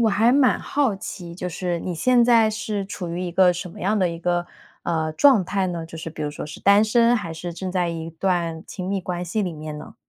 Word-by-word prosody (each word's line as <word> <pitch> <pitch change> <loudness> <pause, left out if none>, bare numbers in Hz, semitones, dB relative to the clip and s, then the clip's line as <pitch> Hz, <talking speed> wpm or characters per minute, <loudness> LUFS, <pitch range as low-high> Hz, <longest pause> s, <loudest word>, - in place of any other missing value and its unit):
我 225 - +4
还 220 +4 +3
蛮 270 -2 +4
好 270 -8 0
奇， 175 -2 -7
就 180 +1 -5
是 175 0 -2
你 180 0 -4
现 245 +7 +4
在 230 -2 +5
是 210 -2 -3
处 185 -3 -5
于 170 +1 -3
一 180 - -3
个 180 +1 +5
什 180 +1 -6
么 - - -12
样 210 +3 +1
的 185 -2 +2
一 170 0 -5
个 175 0 0 0.4
呃， 160 -2 -1
状 250 - +5
态 195 +2 0
呢？ 170 -2 -4
就 165 0 -10
是 165 - -5
比 155 -1 -7
如 150 - -2
说 145 - -7
是 150 - -9
单 200 +1 +5
身 235 +2 +4
还 190 -8 -2
是 175 +2 -6
正 185 +2 -5
在 180 -2 0
一 165 -1 -5
段 165 -1 -1
亲 185 -2 -6
密 195 0 0
关 180 -1 -4
系 180 +5 -1
里 180 -3 -2
面 155 -1 -7
呢？ 150 - -10
180 Hz, 275 characters per minute, -23 LUFS, 170-210 Hz, 0.4 s, 在